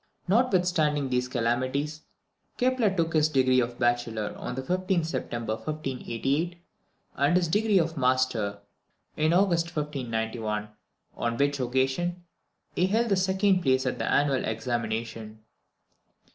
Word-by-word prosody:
Notwithstanding 180 - +2
these 125 0 0
calamities, 130 +5 -1 0.6
Kepler 250 -3 +2
took 165 -4 -1
his 155 -1 +3
degree 130 -3 +3
of 120 0 -1
Bachelor 120 -3 0
on 125 - -5
the 130 - -4
15th 185 +2 0
September 120 -7 -3
1588, 145 +4 -2 0.6
and 145 +5 +3
his 180 -2 +1
degree 210 +4 +2
of 165 -2 0
Master 125 -5 +1 0.5
in 155 +1 +2
August 175 -2 +3
1591, 110 -7 -3 0.5
on 115 0 -2
which 140 +1 +1
occasion 130 +8 0 0.5
he 180 - +2
held 225 +4 +1
the 200 - +3
second 190 0 +2
place 130 -3 +2
at 130 - -2
the - - -1
annual 140 -2 +2
examination. 110 -1 -3
140 Hz, 125 wpm, -27 LUFS, 120-175 Hz, 0.6 s, his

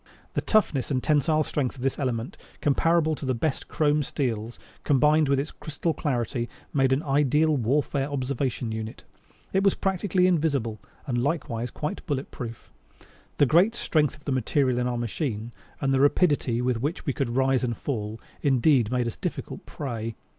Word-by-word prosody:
The - - 0
toughness 180 - +2
and 130 -3 0
tensile 155 +1 +3
strength 140 -3 -2
of 130 - -8
this 135 +2 0
element, 125 -3 -2 0.2
comparable 160 +2 +2
to 150 - -6
the 130 -2 0
best 135 +4 -2
chrome 150 -1 +2
steels, 120 -5 -2 0.3
combined 150 +2 +4
with 140 -1 +3
its 145 +3 -3
crystal 160 +2 -3
clarity, 120 -5 -2 0.2
made 135 -2 +3
an 135 +4 +2
ideal 150 +2 +3
warfare 135 +2 0
observation 130 -4 -2
unit. 110 0 -5 0.5
It 190 - +3
was 195 - +4
practically 190 -1 +1
invisible 145 - +1 0.3
and 120 -4 0
likewise 125 -5 -1
quite 150 +6 -4
bullet 140 -2 -2
proof. 115 -2 -8 0.6
The 145 - +5
great 180 - +4
strength 150 - +1
of 145 - -20
the 145 - -1
material 130 0 +1
in 125 - 0
our 125 -1 -1
machine, 120 -1 -3 0.3
and 135 0 +1
the 135 - +3
rapidity 140 -5 +3
with 125 -2 0
which 150 +7 -2
we 140 - 0
could 125 -3 -2
rise 130 -1 +2
and 120 -2 -1
fall, 110 -5 -3 0.2
indeed 130 -4 +3
made 125 -1 +1
us 115 - -3
difficult - - -5
prey. 115 -5 -4
135 Hz, 170 wpm, -26 LUFS, 120-150 Hz, 0.6 s, The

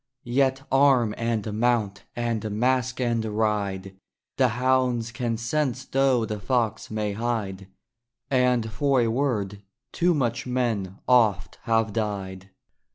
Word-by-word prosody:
Yet 135 +2 +1
arm 135 -5 +4
and 115 -2 -2
mount! 115 -5 0
and 115 -3 -2
mask 125 +4 0
and 120 -2 0
ride! 105 -3 -1 0.4
The 130 - +4
hounds 125 -1 +1
can 120 -1 -2
sense 130 +2 -1
though 135 -3 +2
the 105 -1 -4
fox 110 +2 -1
may 105 -1 -2
hide! 100 -4 -3 0.6
And 125 -4 +2
for 135 +2 +2
a 115 - +1
word 110 -6 -1 0.3
too 175 0 +2
much 120 -3 -1
men 115 -7 -1
oft 105 -7 +3
have 115 -2 +1
died. 100 -3 -4
115 Hz, 125 wpm, -25 LUFS, 105-125 Hz, 0.6 s, arm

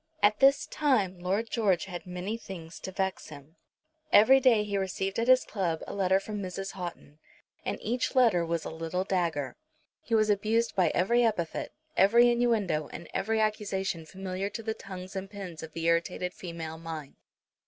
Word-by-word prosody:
At 210 +1 +4
this 275 +1 +5
time 210 -12 +1
Lord 195 +6 -1
George 200 -7 +2
had 180 0 -7
many 180 +4 -4
things 180 -7 -9
to 190 - -6
vex 190 0 -2
him. 150 +1 -13 0.5
Every 260 +6 +7
day 240 -5 +4
he 205 -1 -3
received 195 +1 -2
at 230 - 0
his 255 0 +6
club 175 -6 -2
a - - -7
letter 190 -1 +2
from 210 +1 -5
Mrs. 195 +1 -5
Houghton, 175 -5 -8 0.4
and - - -2
each 245 +4 -1
letter 225 -9 +5
was 165 0 -2
a - - -4
little 165 +3 -2
dagger. 170 -8 -1 0.4
He 230 - -1
was 215 -1 +4
abused 220 +3 +1
by 185 - +4
every 235 +7 +3
epithet, 205 -8 -1 0.2
every 235 +5 +6
innuendo, 215 -11 +1
and 170 - -9
every 220 +2 0
accusation 195 -6 -1
familiar 190 +1 -4
to 225 +2 -6
the 220 0 -1
tongues 185 -2 -9
and 195 0 -4
pens 190 -5 -8
of 160 -1 -9
the 165 0 -4
irritated 170 +2 0
female 165 -2 -7
mind. 160 -3 -7
190 Hz, 175 wpm, -29 LUFS, 170-215 Hz, 0.5 s, Every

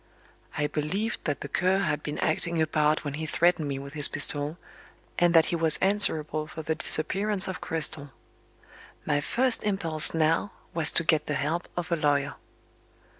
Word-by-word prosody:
I 150 - 0
believed 160 +10 -3
that 145 -5 -2
the - - -5
Cur 185 +6 +1
had 155 -5 -1
been 150 - -5
acting 165 +1 -1
a 160 - +3
part 155 0 0
when 145 - -4
he 155 +2 -5
threatened 170 -2 +1
me 140 -1 -3
with 140 +1 -9
his 150 -2 +6
pistol, 145 +2 -3 0.6
and 175 -1 +3
that 165 -1 +6
he - - +2
was 160 -2 +3
answerable 155 -6 +3
for 160 +1 -8
the 160 - -1
disappearance 195 +6 -1
of 190 - -6
Cristel. 155 -3 -2 1.0
My 145 -1 0
first 250 - +3
impulse 165 -7 +2
now 165 +5 0 0.2
was 160 -2 +1
to 170 - +1
get 155 -2 +1
the 150 - -2
help 165 +4 -2
of 175 0 -4
a - - +3
lawyer. 145 -3 0
155 Hz, 175 wpm, -26 LUFS, 150-175 Hz, 1.0 s, his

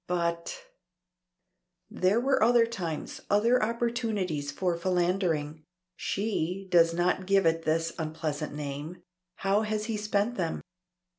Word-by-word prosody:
But 170 - -2 1.3
There 190 +5 +2
were 270 +2 +2
other 235 +1 +5
times, 175 -9 -5
other 230 +5 +4
opportunities 220 - -1
for 175 +3 0
philandering 170 -4 0 0.3
(she 195 -2 -2
does 165 -1 +6
not 180 +2 0
give 195 -2 +4
it 165 0 +2
this 165 +1 +1
unpleasant 155 -1 -3
name); 150 +3 -6 0.3
how 195 +2 +1
has 215 -1 -2
he 225 -1 -2
spent 210 +3 0
them? 170 -4 -2
185 Hz, 120 wpm, -29 LUFS, 165-215 Hz, 1.3 s, does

